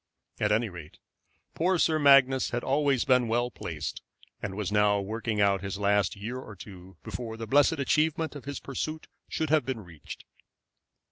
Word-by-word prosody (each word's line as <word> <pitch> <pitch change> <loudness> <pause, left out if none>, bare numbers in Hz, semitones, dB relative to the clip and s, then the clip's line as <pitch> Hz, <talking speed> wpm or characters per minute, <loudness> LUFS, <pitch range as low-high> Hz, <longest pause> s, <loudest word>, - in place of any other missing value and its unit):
At - - +1
any 110 +2 +2
rate, 85 -6 -11 0.6
poor 180 +3 +1
Sir 160 -1 +2
Magnus 135 -2 +5
had 120 0 -3
always 140 -2 +1
been 125 -2 +3
well 120 +2 0
placed, 75 -9 -5 0.4
and 95 -2 -4
was 105 -2 -3
now 105 -1 +3
working 110 +2 -3
out 100 -2 +3
his 100 -1 -4
last 100 -1 +1
year 115 +6 -5
or 110 -5 -10
two 95 -2 -12
before 115 -2 -6
the 115 - -5
blessed 145 +7 +4
achievement 155 +2 0
of 145 - -9
his 140 0 -5
pursuit 155 +3 -5 0.2
should 160 -1 -2
have 155 -3 +4
been 130 -3 -4
reached. 85 -6 -11
115 Hz, 175 wpm, -28 LUFS, 100-140 Hz, 0.6 s, Magnus